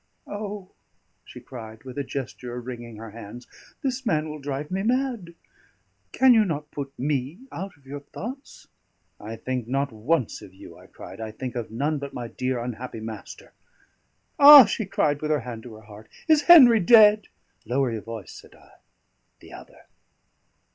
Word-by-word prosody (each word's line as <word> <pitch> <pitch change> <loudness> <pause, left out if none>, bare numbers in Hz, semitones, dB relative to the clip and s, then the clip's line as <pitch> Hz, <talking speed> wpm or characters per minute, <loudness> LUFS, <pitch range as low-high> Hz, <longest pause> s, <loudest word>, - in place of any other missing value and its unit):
"O!" 205 -2 -7 0.5
she - - -12
cried, 110 -3 -11
with 130 -1 -10
a 140 - -2
gesture 125 -2 -6
of 120 - -8
wringing 120 -2 -8
her 110 0 -10
hands, 115 +2 -10 0.4
"this 265 -1 -2
man 160 -9 0
will 150 0 -7
drive 145 +2 -5
me 190 +1 -1
mad! 235 -6 -2 0.8
Can 260 -1 +5
you 220 -2 +5
not 150 -6 -4
put 140 -1 -6
me 140 - -3
out 190 -2 -7
of 140 - -28
your 140 +2 -7
thoughts?" 245 - -10 0.5
"I 110 +2 -7
think 125 0 -4
not 135 +2 -1
once 120 +4 -1
of 95 - -14
you," - - -13
I - - -17
cried. - - -12
"I 110 - -5
think 120 +3 -7
of 120 -2 -4
none 145 +7 -2
but 140 0 -8
my 120 -1 -5
dear 130 +1 -3
unhappy 120 0 -6
master." 110 -2 -9 0.9
"Ah!" 285 -2 +11
she 205 0 -3
cried, 145 -6 0
with 155 - -3
her 150 -3 +1
hand 115 -2 -8
to 115 -1 -11
her 110 - -14
heart, 105 0 -15 0.2
"is 310 -2 +5
Henry 250 -10 +9
dead?" 210 +1 +6 0.4
"Lower 125 +2 0
your 110 -2 -4
voice," 115 -2 -9
said - - -14
I. - - -21 0.7
"The - - -15
other." - - -14
135 Hz, 175 wpm, -24 LUFS, 115-195 Hz, 0.9 s, Ah